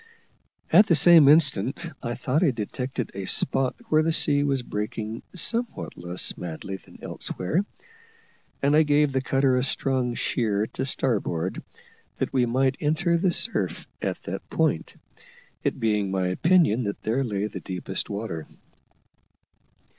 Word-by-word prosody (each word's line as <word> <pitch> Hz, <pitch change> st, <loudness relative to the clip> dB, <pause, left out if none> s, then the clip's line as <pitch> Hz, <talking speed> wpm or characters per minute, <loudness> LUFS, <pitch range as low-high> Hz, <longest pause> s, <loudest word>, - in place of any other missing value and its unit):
At 205 Hz, -, +8 dB
the 170 Hz, -, +4 dB
same 165 Hz, -3 st, +7 dB
instant 145 Hz, -, +3 dB
I 120 Hz, 0 st, -3 dB
thought 145 Hz, +7 st, 0 dB
I 170 Hz, -, +4 dB
detected 125 Hz, +1 st, -4 dB
a 95 Hz, 0 st, -5 dB
spot 130 Hz, +4 st, +1 dB
where 155 Hz, 0 st, +4 dB
the 165 Hz, +1 st, +1 dB
sea 145 Hz, -2 st, +3 dB
was 135 Hz, -3 st, 0 dB
breaking 110 Hz, +1 st, -4 dB
somewhat 230 Hz, +7 st, 0 dB
less 85 Hz, +1 st, -1 dB
madly 90 Hz, +3 st, -6 dB
than -, -, -18 dB
elsewhere, 125 Hz, -, -2 dB, 1.0 s
and 145 Hz, +2 st, +4 dB
I 155 Hz, -, +6 dB
gave 150 Hz, -1 st, +3 dB
the 130 Hz, 0 st, 0 dB
cutter 135 Hz, 0 st, +2 dB
a 125 Hz, -, +1 dB
strong 130 Hz, -3 st, 0 dB
sheer 110 Hz, -5 st, 0 dB
to 130 Hz, -, -4 dB
starboard, 100 Hz, -10 st, -1 dB, 0.6 s
that -, -, -2 dB
we 125 Hz, -2 st, +2 dB
might 130 Hz, +2 st, +1 dB
enter 160 Hz, +3 st, +1 dB
the 180 Hz, +2 st, +2 dB
surf 230 Hz, -, 0 dB, 0.2 s
at -, -, -3 dB
that -, -, -6 dB
point, -, -, 0 dB, 0.7 s
it -, -, -1 dB
being 105 Hz, -4 st, +1 dB
my 95 Hz, -1 st, 0 dB
opinion 155 Hz, -, +3 dB
that 100 Hz, -, -4 dB
there 120 Hz, +5 st, 0 dB
lay 105 Hz, -4 st, -2 dB
the 105 Hz, -, -5 dB
deepest 95 Hz, +1 st, -4 dB
water. 100 Hz, -6 st, -5 dB
130 Hz, 145 wpm, -25 LUFS, 105-150 Hz, 1.0 s, At